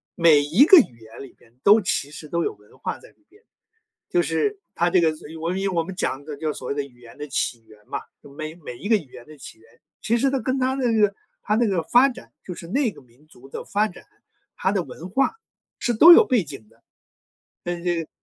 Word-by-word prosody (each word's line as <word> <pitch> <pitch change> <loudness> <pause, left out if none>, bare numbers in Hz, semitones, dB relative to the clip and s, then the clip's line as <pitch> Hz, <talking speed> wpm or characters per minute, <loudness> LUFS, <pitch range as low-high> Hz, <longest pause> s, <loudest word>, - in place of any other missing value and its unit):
每 160 -4 +5
一 165 - +4
个 375 - +9
语 125 - -1
言 110 0 -13
里 135 - -12
面， 115 - -24
都 210 +2 +7
其 165 -6 -1
实 150 +1 -10
都 170 +2 -1
有 - - -2
文 105 0 -23
化 - - -4
在 - - -17
里 315 - -31
边， 410 +6 -24 0.7
就 355 - +2
是 420 +2 -1 0.2
它 175 +1 +2
这 185 - +3
个 165 -2 +3
就 - - -15
我 165 - -3
们 185 +2 -2
因 195 0 -1
我 170 -2 0
们 190 +3 -8
讲 140 -5 -3
的 150 -1 -6
就 155 +2 -4
是 - - -9
所 - - -7
谓 - - -1
的 145 0 -2
语 125 -3 -16
言 120 -1 -15
的 150 - -7
起 120 -3 -2
源 105 -1 -20
嘛， - - -4 0.2
就 140 - -15
每 155 +2 -7
每 145 -8 -10
一 205 - -7
个 225 - +5
语 150 -10 -12
言 120 -1 -12
的 155 0 -14
起 130 - -12
源， 115 +1 -24 0.2
其 230 +2 +1
实 275 +3 +2
它 270 - 0
跟 255 +3 -2
它 260 +1 0
的 255 -3 0
那 225 - +1
个 205 -1 +3 0.3
它 210 - 0
那 235 +1 +2
个 185 -5 0
发 245 +11 +5
展， 245 - -11
就 180 - -7
是 165 - -10
那 245 +5 0
个 - - -16
民 125 +5 -26
族 135 -4 -17
的 - - -7
发 210 +2 0
展， 180 - -14 0.5
它 190 - 0
的 200 -2 0
文 175 +2 -10
化 270 - +1 0.4
是 240 - -1
都 320 +10 +9
有 430 +6 +7
背 245 - +2
景 135 -8 -11
的。 115 +1 -28 0.8
嗯， 175 0 -4
这 175 -2 0
个 - - -24
170 Hz, 285 characters per minute, -23 LUFS, 140-225 Hz, 0.8 s, 个